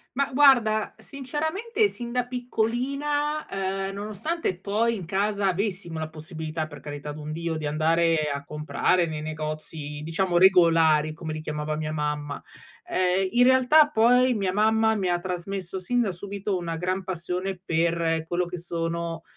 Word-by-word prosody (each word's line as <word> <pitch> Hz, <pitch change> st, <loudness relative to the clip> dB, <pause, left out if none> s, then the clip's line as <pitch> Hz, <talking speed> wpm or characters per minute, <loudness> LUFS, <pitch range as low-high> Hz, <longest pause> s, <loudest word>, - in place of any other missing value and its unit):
Ma 280 Hz, 0 st, 0 dB
guarda, 240 Hz, -6 st, +4 dB
sinceramente 315 Hz, -, -1 dB
sin 240 Hz, -7 st, -7 dB
da 250 Hz, 0 st, 0 dB
piccolina, 265 Hz, +5 st, -1 dB
ehm, 195 Hz, 0 st, -3 dB
nonostante 210 Hz, -, -3 dB
poi 220 Hz, +4 st, +1 dB
in 185 Hz, -6 st, -6 dB
casa 200 Hz, +2 st, 0 dB
avessimo 185 Hz, -3 st, -2 dB
la 155 Hz, 0 st, -4 dB
possibilità, 155 Hz, 0 st, -5 dB
per 145 Hz, -1 st, -11 dB
carità 145 Hz, 0 st, -7 dB
d'un 150 Hz, +1 st, -7 dB
Dio, 165 Hz, +1 st, -3 dB
di 155 Hz, -1 st, -3 dB
andare 160 Hz, +1 st, +2 dB
a 140 Hz, 0 st, -5 dB
comprare 150 Hz, +4 st, +1 dB
nei 155 Hz, -2 st, -4 dB
negozi 155 Hz, -1 st, -5 dB
diciamo 175 Hz, +2 st, +1 dB
regolari, 165 Hz, -4 st, +5 dB
come 160 Hz, -1 st, -6 dB
li 155 Hz, -, -5 dB
chiamava 150 Hz, 0 st, -3 dB
mia 155 Hz, 0 st, -3 dB
mamma. 150 Hz, -1 st, -3 dB, 0.5 s
Ehm, 185 Hz, +1 st, +1 dB
in 240 Hz, +5 st, +4 dB
realtà 260 Hz, +4 st, +6 dB
poi 250 Hz, +2 st, +4 dB
mia 195 Hz, -4 st, 0 dB
mamma 220 Hz, +2 st, +3 dB
mi 195 Hz, -3 st, -1 dB
ha 175 Hz, 0 st, +1 dB
trasmesso 185 Hz, +1 st, -4 dB
sin 245 Hz, +7 st, 0 dB
da 215 Hz, -5 st, 0 dB
subito 200 Hz, +2 st, -4 dB
una 170 Hz, -2 st, -4 dB
gran 185 Hz, +3 st, -2 dB
passione 180 Hz, +1 st, -3 dB
per 165 Hz, -1 st, +1 dB
quello 175 Hz, +2 st, -1 dB
che 175 Hz, +1 st, -6 dB
sono, 170 Hz, -1 st, -3 dB
180 Hz, 155 wpm, -26 LUFS, 160-220 Hz, 0.5 s, realtà